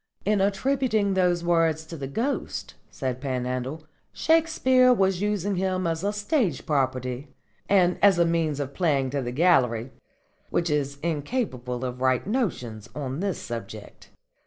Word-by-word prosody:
"In 205 -1 +2
attributing 215 0 +1
those 180 -2 +2
words 165 -2 +2
to 165 - -8
the 140 -4 -5
Ghost," 235 - -3 0.2
said 130 -2 -4
Panhandle, 130 +2 -3 0.3
"Shakespeare 310 -6 +3
was 195 -5 +2
using 205 -2 0
him 185 0 0
as 165 +1 -1
a 200 - +1
stage 210 - 0
property 130 -2 -1 0.4
and 180 -3 +3
as 200 -3 +6
a 170 - +4
means 165 -3 0
of 140 -1 -4
playing 140 -6 +1
to 140 0 -1
the 120 -1 -3
gallery, 125 -6 +2 0.6
which 170 -2 0
is 140 -1 -1
incapable 145 - -2
of 125 0 -5
right 130 -1 +2
notions 125 - -2
on 135 -1 -4
this 195 -1 -1
subject. 110 -3 -8
165 Hz, 145 wpm, -26 LUFS, 130-200 Hz, 0.6 s, as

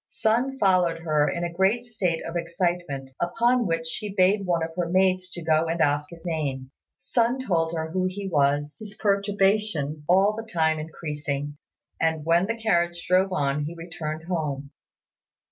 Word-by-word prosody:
Sun 245 +5 0
followed 180 -6 +2
her 155 -3 +2
in 170 - -3
a 170 -1 -3
great 195 +7 +2
state 185 -8 -1
of 165 - -6
excitement, 170 -5 -2
upon 235 +6 +2
which 165 -1 -1
she 205 +5 -4
bade 195 +1 +3
one 170 -2 +1
of 165 - -3
her 175 -2 -1
maids 185 0 +2
to 175 -2 -7
go 160 0 +2
and 165 +1 -2
ask 145 -1 +1
his 170 0 -13
name. 140 -6 -3 0.3
Sun 240 +7 0
told 165 -4 +1
her 160 0 -3
who 185 +1 0
he 195 +1 -5
was, 145 -2 +1
his 210 -1 -8
perturbation 200 -7 +1
all 195 +4 +4
the 225 0 -7
time 160 -2 +2
increasing; 150 -2 -4 0.5
and 160 -2 +1
when 170 +3 +3
the 230 +1 -2
carriage 175 -6 0
drove 185 +1 +3
on 145 -3 0
he 165 +3 -6
returned 160 -2 -6
home. 150 -5 -3
170 Hz, 170 wpm, -25 LUFS, 155-195 Hz, 0.5 s, all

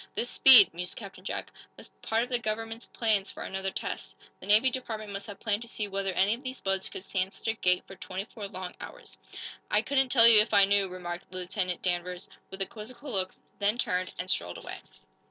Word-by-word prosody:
"This 240 - -2
speed," 245 -10 +8
mused 180 +1 -5
Captain 195 -3 -10
Jack, - - -5 0.3
"must - - -11
be - - -18
part 225 +1 +2
of 245 - -6
the 245 -1 +1
government's 225 +1 -4
plans 215 -4 +1
for - - -8
another 190 0 -2
test. - - -5 0.2
The - - -10
Navy 215 +5 +5
Department 220 -5 -5
must 195 +2 -6
have 205 -2 -9
planned 210 -1 -1
to 235 - -7
see 215 -2 -3
whether 195 -1 -2
any 195 +4 +3
of 235 - -6
these 260 -1 -6
boats 195 -1 -1
could - - -7
stand 190 -1 -2
such - - -4
a - - +2
gait 180 -5 +1
for - - -12
twenty 190 +1 -6
four 210 -2 -8
long 185 -2 -7
hours." - - -11 0.5
"I 210 +1 +2
couldn't 270 +1 +2
tell 230 -3 +7
you 225 -2 +9
if 215 0 +3
I 200 -1 +7
knew," 200 0 +2
remarked 180 -1 -7
Lieutenant 185 0 -3
Danvers, 180 0 -1 0.2
with 190 0 -2
a - - -4
quizzical 235 +7 -9
look, 185 -3 0 0.2
then 205 +3 +2
turned 185 -5 -1
and 180 - -4
strolled 90 - 0
away. - - -8
200 Hz, 225 wpm, -28 LUFS, 185-225 Hz, 0.5 s, you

